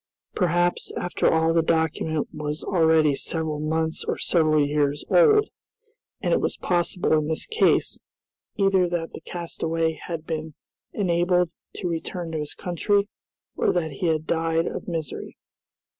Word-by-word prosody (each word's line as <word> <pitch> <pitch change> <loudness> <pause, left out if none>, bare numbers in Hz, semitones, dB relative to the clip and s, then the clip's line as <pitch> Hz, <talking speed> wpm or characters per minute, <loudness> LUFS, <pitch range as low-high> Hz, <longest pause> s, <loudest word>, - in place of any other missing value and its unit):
Perhaps, 175 -1 +1
after 175 - +1
all 160 0 +3
the 165 - +4
document 160 -1 0
was 150 0 -4
already 160 -4 +3
several 155 +1 -2
months 160 +1 -1
or - - -2
several 155 -3 +3
years 145 0 0
old, 435 -3 +5 0.7
and - - +1
it - - +2
was - - -1
possible 175 -1 0
in 155 -1 +2
this 160 0 -1
case, 450 - +2 0.6
either 195 -3 +3
that 170 -1 -3
the - - -8
castaway 165 -1 -2
had 160 0 -7
been 160 -2 -4 0.4
enabled 180 -2 +1 0.2
to 180 - -3
return 170 0 -4
to 160 - -2
his 150 -1 -5
country, 200 +3 0 0.5
or - - +2
that 160 -3 -1
he 155 +6 -2
had 160 -1 0
died 165 0 +1
of - - -5
misery. 165 -3 -5
165 Hz, 145 wpm, -24 LUFS, 155-175 Hz, 0.7 s, old